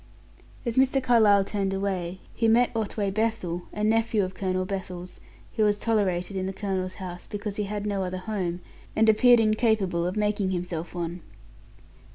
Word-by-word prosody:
As 235 0 -2
Mr. 265 +1 +4
Carlyle 220 -6 +5
turned 195 -1 -2
away, 190 -2 -2
he 225 - +1
met 235 +2 +3
Otway 210 -2 -1
Bethel, 200 -5 -1
a 210 - -4
nephew 225 -1 +2
of 185 0 -4
Colonel 185 -1 -1
Bethel's, 185 -2 -6 0.4
who 220 - +3
was 205 -1 +3
tolerated 200 -4 0
in 190 0 -1
the 190 - -3
colonel's 190 -2 -3
house 180 -2 -7
because 205 -1 -5
he 210 - -1
had 205 0 -4
no 200 -2 -1
other 185 0 -3
home, 185 -3 -3 0.3
and 225 0 +4
appeared 240 +2 +6
incapable 215 -6 +2
to 200 - -7
making 210 -2 +1
himself 175 -2 -4
one. 170 0 -4
200 Hz, 170 wpm, -26 LUFS, 185-215 Hz, 0.4 s, appeared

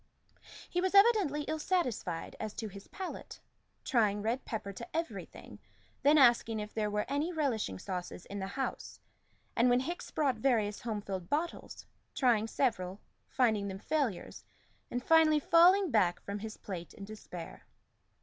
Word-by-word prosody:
He 355 - -1
was 375 +1 0
evidently 395 -9 +5
ill 310 +1 -3
satisfied 250 - -1
as 215 -1 -5
to 220 -2 -4
his 200 0 -11
palate, 380 -2 -7 0.4
trying 210 -4 +2
red 235 +4 -1
pepper 210 -3 -4
to 235 +10 -6
everything, 330 0 -6 0.4
then 295 +2 +5
asking 235 -4 +5
if 210 0 -6
there 215 -1 0
were 210 0 -1
any 290 +5 -1
relishing 255 - -1
sauces 180 - -6
in 200 - -6
the 190 - -3
house, 265 +7 -4 0.6
and 240 +2 +4
when 245 +1 +4
Hickes 345 +6 -5
brought 275 -6 0
various 220 -4 +1
home 220 -3 -3
filled 190 -3 -5
bottles, 325 +4 -3 0.3
trying 230 -5 +3
several, 205 -7 -1 0.3
finding 220 -6 +2
them 190 -1 -5
failures, 250 - -2 0.5
and 245 0 -3
finally 320 -1 +5
falling 350 +4 +5
back 185 -6 +3
from 200 +1 -4
his 220 +1 -7
plate 175 -4 -7
in 200 - -8
despair. 190 -5 -9
230 Hz, 155 wpm, -32 LUFS, 205-300 Hz, 0.6 s, evidently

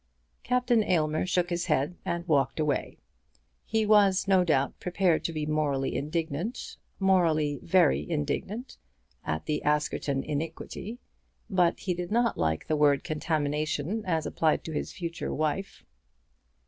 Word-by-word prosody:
Captain 250 -2 +2
Aylmer 155 -3 +1
shook 180 -1 +1
his 175 +1 -1
head 150 +1 +1
and 170 +1 -3
walked 140 -2 +2
away. 150 -3 -1 0.7
He 220 -1 +1
was, 200 -3 +4
no 190 -2 +5
doubt, 140 -6 +1
prepared 180 -2 +1
to - - 0
be 155 -2 -3
morally 145 -3 0
indignant, 160 - -3 0.2
morally 165 -7 +2
very 175 -2 +3
indignant, 170 - -3 0.5
at 80 0 -3
the 150 - -1
Askerton 150 -2 0
iniquity; 165 +8 -5 0.5
but 180 -2 +2
he 185 - -1
did 175 +1 -5
not 235 +1 +2
like 80 -1 -1
the 155 - 0
word 145 -2 +3
contamination 155 +5 -1
as 160 -3 0
applied 160 -1 +1
to 160 - -6
his - - -3
future 170 -2 -5
wife. 155 +6 -2
160 Hz, 135 wpm, -28 LUFS, 150-185 Hz, 0.7 s, no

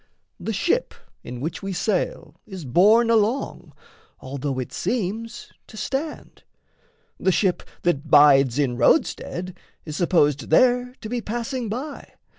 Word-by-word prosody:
The 225 - -3
ship 345 - 0 0.3
in 125 0 -7
which 160 +4 -4
we 195 0 -4
sail 180 -5 -2
Is 190 -6 -8
borne 215 - +4
along, 225 +4 0 0.5
although 135 0 -4
it 130 - -5
seems 230 +1 -3 0.2
to 215 - -13
stand; 280 +7 -5 0.8
The 190 - +2
ship 185 -1 +1 0.2
that 155 -3 0
bides 140 -4 +6
in 130 -4 0
roadstead 180 - +1 0.3
is 155 -2 -6
supposed 150 -5 +1
There 250 +6 +3
to 220 - -6
be 240 +1 -3
passing 235 +2 -4
by. 270 +7 -6
190 Hz, 130 wpm, -23 LUFS, 150-235 Hz, 0.8 s, bides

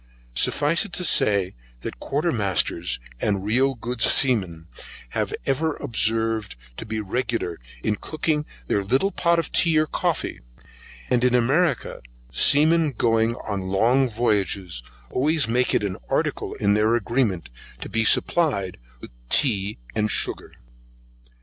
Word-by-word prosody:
Suffice 150 - +2
it 205 - -10
to 180 - -1
say, 100 - +3 0.3
that - - -7
Quarter 150 +5 -1
masters, 95 - -1 0.2
and 100 - -1
real 130 +5 +2
good 120 0 -5
seamen 95 - +2 0.4
have - - -2
ever 155 +4 0
been - - -12
observed 115 - 0 0.2
to 115 - -7
be 110 0 -3
regular 110 -4 -2 0.2
in 105 - 0
cooking 155 +2 -2 0.2
their 100 +10 0
little 130 - +1
pot 170 -2 +1
of 165 - -2
tea 165 -2 +3
or 155 - +3
coffee, - - -2 0.7
and 125 -1 +2
in 125 -1 +3
America 140 +9 +1 0.3
seamen 155 - +4
going 115 0 +1
long 110 +7 +1
voyages, 100 - -1 0.3
always 150 +2 +2
make 125 +2 +1
it - - +1
an 95 -2 -3
article - - -1
in 100 - +1
their 110 +2 +3
agreement 115 - -1 0.3
to - - -5
be 115 0 0
supplied 105 - +2 0.2
with - - -10 0.2
tea 105 -7 +2 0.2
and 105 0 0
sugar. - - -1
115 Hz, 135 wpm, -23 LUFS, 100-140 Hz, 0.7 s, seamen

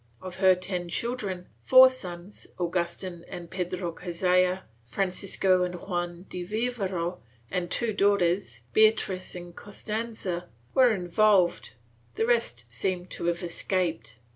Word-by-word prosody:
Of 185 -1 -8
her 190 -1 +6
ten 180 -1 -4
children, 200 -4 -3 0.2
four 260 0 +9
sons, 185 -6 -7
Agustin 175 0 -2
and 170 -1 -8
Pedro 180 -1 -3
Cazalla, 180 +2 +1 0.2
Francisco 185 +5 +1
and 180 0 -1
Juan 175 -1 -4
de 180 - -5
Vivero, 195 -4 -2 0.3
and 175 -1 -1
two 230 +2 0
daughters, 190 - +2
Beatriz 215 -4 +3
and 175 -1 -9
Costanza, 205 -4 -4 0.2
were 255 -2 +6
involved; 190 -1 +2 0.4
the 225 - +1
rest 230 - 0
seem 180 +8 -2
to - - -5
have 170 +1 0
escaped. 170 - -2
185 Hz, 120 wpm, -27 LUFS, 175-200 Hz, 0.4 s, four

